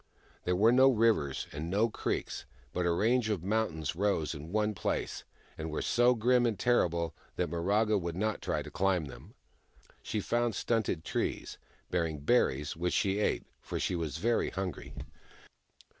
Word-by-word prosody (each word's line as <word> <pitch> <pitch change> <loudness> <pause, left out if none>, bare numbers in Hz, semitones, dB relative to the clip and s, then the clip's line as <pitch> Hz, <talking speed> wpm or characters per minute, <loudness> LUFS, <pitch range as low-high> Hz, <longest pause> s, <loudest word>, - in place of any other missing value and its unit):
There 90 - +2
were 110 +5 +5
no 130 +2 +7
rivers, 110 - +2
and 75 +3 -5
no 105 +5 +3
creeks, 115 - -3 0.3
but 90 -1 0
a - - +3
range 110 +6 +2
of 100 -6 -1
mountains 90 -8 -1
rose 95 -4 0
in 75 +2 -8
one 105 +1 +1
place, 90 - -2 0.4
and 80 +1 -3
were 75 - -3
so 120 +1 +4
grim 120 +2 +3
and 110 -4 -1
terrible 85 -9 +1 0.2
that - - -1
Miraga 100 +5 +2
would 85 -1 -3
not 110 +3 -1
try - - -1
to - - -10
climb 95 -4 +1
them. 70 - -12 0.7
She 110 - -2
found 120 +1 0
stunted 110 -8 0
trees, - - -3 0.3
bearing 85 -3 0
berries, 75 - +1
which 90 +2 -1
she 100 +1 +1
ate, 105 - 0 0.2
for - - -4
she 90 - 0
was 80 -4 -3
very 115 +7 +1
hungry. 95 -2 -5
95 Hz, 165 wpm, -31 LUFS, 85-110 Hz, 0.7 s, no